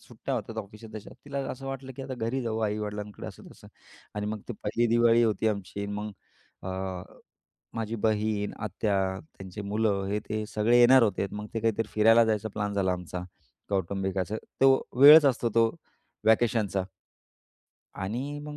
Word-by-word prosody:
सुट्ट्या -, -, -5 dB
होत्यात 110 Hz, -, -4 dB
ऑफिसात 110 Hz, +2 st, -8 dB
तशा. 110 Hz, -1 st, -8 dB
तिला 140 Hz, -1 st, -4 dB
असं 135 Hz, +1 st, -7 dB
वाटलं, 135 Hz, 0 st, -6 dB
की 135 Hz, -, -6 dB
आता 130 Hz, 0 st, -5 dB
घरी 120 Hz, +2 st, -2 dB
जाऊ 110 Hz, -2 st, -2 dB
आई-वडिलांकडे 105 Hz, -1 st, -5 dB
असं-तसं -, -, -12 dB, 0.5 s
आणि 105 Hz, 0 st, -3 dB
मग 105 Hz, 0 st, -3 dB
ती -, -, -2 dB
पहिली 115 Hz, +3 st, +1 dB
दिवाळी 120 Hz, 0 st, +5 dB
होती 110 Hz, -1 st, +1 dB
आमची. 100 Hz, -1 st, -4 dB
मग 105 Hz, +1 st, -4 dB, 0.5 s
अ, 95 Hz, -, -5 dB, 1.1 s
माझी 115 Hz, 0 st, -3 dB
बहीण, 105 Hz, -1 st, 0 dB
आत्या, 105 Hz, +1 st, -1 dB, 0.4 s
त्यांची 95 Hz, +2 st, -8 dB
मुलं 100 Hz, -1 st, 0 dB
हे 105 Hz, +1 st, 0 dB
ते 110 Hz, 0 st, -2 dB
सगळे 110 Hz, +3 st, +2 dB
येणार 125 Hz, +1 st, +7 dB
होते. 100 Hz, -2 st, 0 dB
मग 105 Hz, +1 st, -6 dB
ते 115 Hz, -, -1 dB
काहीतरी 115 Hz, -1 st, 0 dB
फिरायला 115 Hz, +2 st, +6 dB
जायचा 110 Hz, 0 st, -1 dB
प्लॅन 105 Hz, -1 st, -2 dB
झाला 95 Hz, -2 st, +1 dB
आमचा 90 Hz, 0 st, -6 dB, 0.5 s
कौटुंबिक 95 Hz, 0 st, -1 dB
असं. 100 Hz, +4 st, -1 dB, 0.2 s
तो 135 Hz, 0 st, +7 dB, 0.2 s
वेळच 150 Hz, +2 st, +10 dB
असतो 125 Hz, -3 st, +2 dB
तो 115 Hz, 0 st, +5 dB, 0.6 s
व्हॅकेशनचा. 110 Hz, -4 st, +2 dB, 1.1 s
आणि 125 Hz, +10 st, -4 dB
मग 150 Hz, 0 st, -8 dB
110 Hz, 160 wpm, -28 LUFS, 105-115 Hz, 1.1 s, वेळच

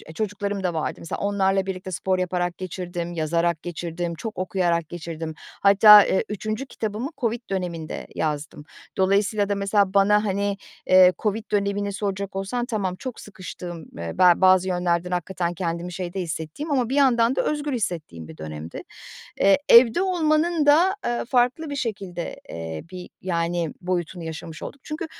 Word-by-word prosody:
çocuklarım 205 Hz, -1 st, -3 dB
da 180 Hz, -2 st, 0 dB
vardı. 160 Hz, -2 st, -2 dB
Mesela 165 Hz, -, -5 dB
onlarla 195 Hz, -1 st, +1 dB
birlikte 185 Hz, -1 st, -5 dB
spor 185 Hz, +1 st, -1 dB
yaparak 180 Hz, -1 st, -1 dB
geçirdim, 175 Hz, -1 st, -5 dB
yazarak 170 Hz, 0 st, 0 dB
geçirdim, 175 Hz, 0 st, -4 dB
çok 215 Hz, +7 st, -6 dB
okuyarak 175 Hz, -3 st, 0 dB
geçirdim. 165 Hz, -2 st, -6 dB
Hatta, 205 Hz, +2 st, +7 dB
eee, 190 Hz, -, +1 dB
3. 215 Hz, +4 st, -3 dB
kitabımı 225 Hz, +1 st, -4 dB
Covid 235 Hz, -1 st, -1 dB
döneminde 175 Hz, -4 st, -4 dB
yazdım. 150 Hz, -1 st, -3 dB, 0.3 s
Dolayısıyla 200 Hz, +2 st, +2 dB
da 205 Hz, -, +1 dB
mesela 200 Hz, -1 st, +1 dB
bana, 210 Hz, +1 st, +4 dB
hani, 200 Hz, 0 st, -1 dB, 0.3 s
eee, 185 Hz, 0 st, +7 dB
Covid 215 Hz, +1 st, -1 dB
dönemini 200 Hz, 0 st, 0 dB
soracak 200 Hz, -1 st, -3 dB
olsan 215 Hz, +6 st, -2 dB
tamam 205 Hz, -7 st, -2 dB
çok 255 Hz, +4 st, -7 dB
sıkıştığım, 175 Hz, -4 st, -8 dB
eee, 85 Hz, 0 st, -5 dB
be 180 Hz, -1 st, +7 dB
bazı 185 Hz, 0 st, +5 dB
yönlerden 180 Hz, 0 st, 0 dB
hakikaten 175 Hz, 0 st, -2 dB
kendimi 170 Hz, 0 st, -3 dB
şeyde 185 Hz, +1 st, -4 dB
hissettiğim 165 Hz, -, -5 dB
ama 255 Hz, -5 st, +1 dB
bir 270 Hz, -, -1 dB
yandan 255 Hz, -3 st, +4 dB
da -, -, +2 dB
özgür 295 Hz, -2 st, -1 dB
hissettiğim 155 Hz, -, -4 dB
bir 80 Hz, 0 st, -12 dB
dönemdi. 80 Hz, +1 st, -7 dB, 0.6 s
Eee, 195 Hz, 0 st, +5 dB
evde 235 Hz, +8 st, +7 dB
olmanın 330 Hz, -3 st, +1 dB
da, 335 Hz, +7 st, +5 dB
eee, 240 Hz, 0 st, -1 dB
farklı 255 Hz, +5 st, +1 dB
bir 285 Hz, -, -3 dB
şekilde, 195 Hz, -9 st, -4 dB
eee, 80 Hz, -1 st, -6 dB
bir, 180 Hz, -1 st, -8 dB
yani, 170 Hz, -2 st, -1 dB
boyutunu 175 Hz, -1 st, -3 dB
yaşamış 160 Hz, 0 st, -7 dB
olduk. 280 Hz, -, -8 dB
Çünkü 310 Hz, +2 st, -4 dB
190 Hz, 155 wpm, -24 LUFS, 170-215 Hz, 0.6 s, Hatta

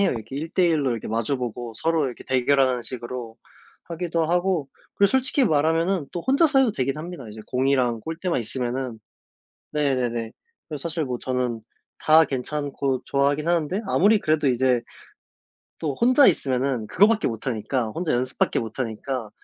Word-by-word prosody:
해요. 200 Hz, -, +3 dB
이렇게 115 Hz, +3 st, -6 dB
1 160 Hz, +3 st, -4 dB
대 185 Hz, 0 st, +2 dB
1 160 Hz, -4 st, +1 dB
로 130 Hz, -, +1 dB
이렇게 115 Hz, -, -5 dB
마주 115 Hz, +5 st, 0 dB
보고 120 Hz, -1 st, -5 dB
서로 160 Hz, -1 st, +1 dB
이렇게 125 Hz, -, -7 dB
대결하는 130 Hz, -1 st, +2 dB
식으로 120 Hz, -2 st, -6 dB, 0.5 s
하기도 170 Hz, -1 st, -2 dB
하고 175 Hz, -3 st, 0 dB, 0.3 s
그리고 200 Hz, -1 st, +3 dB
솔직히 265 Hz, +1 st, +2 dB
말하면은 165 Hz, +1 st, +1 dB
또 175 Hz, -, -3 dB
혼자서 280 Hz, 0 st, +4 dB
해도 245 Hz, -5 st, +3 dB
되긴 135 Hz, -3 st, -1 dB
합니다 160 Hz, -7 st, -7 dB
이제 110 Hz, +1 st, -9 dB
공이랑 125 Hz, -3 st, +1 dB
골대만 165 Hz, -, -2 dB
있으면은. 125 Hz, 0 st, -3 dB, 0.7 s
네네네. 125 Hz, -6 st, -1 dB, 0.4 s
그래서 150 Hz, -4 st, -6 dB
사실 165 Hz, -1 st, -2 dB
뭐 125 Hz, -1 st, -3 dB
저는 125 Hz, -3 st, -2 dB, 0.4 s
다 160 Hz, +1 st, +6 dB
괜찮고 140 Hz, -1 st, -2 dB
좋아하긴 140 Hz, +3 st, +1 dB
하는데 175 Hz, +4 st, 0 dB
아무리 205 Hz, +3 st, +4 dB
그래도 155 Hz, -3 st, +1 dB
이제 125 Hz, -1 st, +2 dB, 1.0 s
또 145 Hz, -4 st, -2 dB
혼자 255 Hz, +4 st, +6 dB
있으면은 130 Hz, -, 0 dB
그거밖에 215 Hz, -, +3 dB
못 115 Hz, 0 st, -5 dB
하니까 120 Hz, +1 st, -1 dB
혼자 165 Hz, +5 st, -2 dB
연습밖에 125 Hz, +1 st, 0 dB
못 115 Hz, +3 st, -7 dB
하니까 120 Hz, 0 st, -3 dB
140 Hz, 365 characters per minute, -24 LUFS, 125-165 Hz, 1.0 s, 다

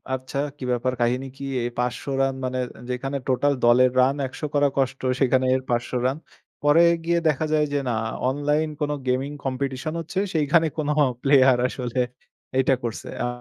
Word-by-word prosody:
আচ্ছা 130 Hz, +1 st, -5 dB, 0.2 s
কি -, -, -9 dB
ব্যাপার 125 Hz, +1 st, 0 dB
কাহিনী 125 Hz, +3 st, +1 dB
কি? 140 Hz, -, -6 dB, 0.2 s
এই 120 Hz, -, -1 dB
৫০০ 125 Hz, 0 st, -1 dB, 0.2 s
রান 135 Hz, 0 st, +2 dB
মানে? 130 Hz, 0 st, -2 dB, 0.3 s
যেখানে 135 Hz, +3 st, -2 dB
টোটাল 140 Hz, +2 st, +2 dB
দলের 125 Hz, +1 st, +5 dB
রান 135 Hz, +2 st, +3 dB
১০০ 130 Hz, -, -12 dB
করা 145 Hz, 0 st, +4 dB
কষ্ট 135 Hz, 0 st, 0 dB, 0.2 s
সেখানে 130 Hz, -1 st, +3 dB
এর 130 Hz, -, -1 dB
৫০০ 120 Hz, 0 st, -1 dB
রান। 135 Hz, +3 st, +1 dB, 0.5 s
পরে 150 Hz, +3 st, +6 dB, 0.2 s
গিয়ে 170 Hz, 0 st, +2 dB
দেখা 150 Hz, +2 st, 0 dB
যায় 150 Hz, -1 st, +3 dB
যে 145 Hz, -, +2 dB
না 115 Hz, -, 0 dB, 0.3 s
অনলাইন 150 Hz, +3 st, 0 dB
কোন 150 Hz, 0 st, 0 dB, 0.2 s
গেমিং 130 Hz, +3 st, 0 dB
কম্পিটিশন 135 Hz, +3 st, -2 dB
হচ্ছে, 165 Hz, +4 st, -3 dB
সেইখানে 160 Hz, +1 st, +3 dB
কোন 150 Hz, -2 st, -1 dB, 0.4 s
প্লেয়ার 135 Hz, -2 st, +5 dB
আসলে 125 Hz, -1 st, -2 dB, 0.6 s
এইটা 130 Hz, 0 st, +3 dB
করছে। 115 Hz, -2 st, -5 dB, 0.2 s
আ -, -, 0 dB
135 Hz, 170 wpm, -24 LUFS, 130-145 Hz, 0.6 s, পরে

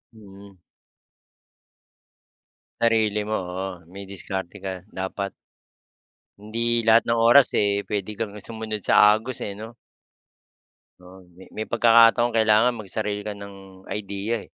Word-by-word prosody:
Mm. 100 Hz, -2 st, -15 dB, 2.2 s
Sarili 110 Hz, -2 st, +1 dB
mo, 110 Hz, +1 st, -1 dB
oo. 90 Hz, +1 st, -5 dB, 0.2 s
May 100 Hz, +1 st, -9 dB
diskarte 95 Hz, 0 st, -6 dB
ka, 95 Hz, -1 st, -4 dB, 0.3 s
dapat. 100 Hz, +1 st, -4 dB, 1.1 s
Hindi 115 Hz, +2 st, -1 dB
lahat 115 Hz, +1 st, +4 dB
ng 115 Hz, -, +2 dB
oras, 120 Hz, +3 st, +6 dB
eh, 100 Hz, 0 st, +1 dB
pwede 105 Hz, 0 st, -3 dB
kang 105 Hz, -1 st, -5 dB
sumunod 110 Hz, +1 st, -6 dB
sa 105 Hz, +1 st, +6 dB
agos, 120 Hz, +3 st, -6 dB
eh, 100 Hz, -1 st, -5 dB
no? 115 Hz, +2 st, -10 dB, 1.2 s
Oo, 90 Hz, +1 st, -15 dB, 0.2 s
me 95 Hz, -, -13 dB
may 110 Hz, -, -5 dB
pagkakataon 115 Hz, 0 st, +5 dB
kailangan 110 Hz, +2 st, +3 dB
magsarili 105 Hz, -1 st, -4 dB
ka 105 Hz, -1 st, -6 dB
ng 95 Hz, -1 st, -13 dB
idea, 105 Hz, +2 st, -4 dB
eh. -, -, -13 dB
105 Hz, 125 wpm, -23 LUFS, 100-115 Hz, 2.2 s, oras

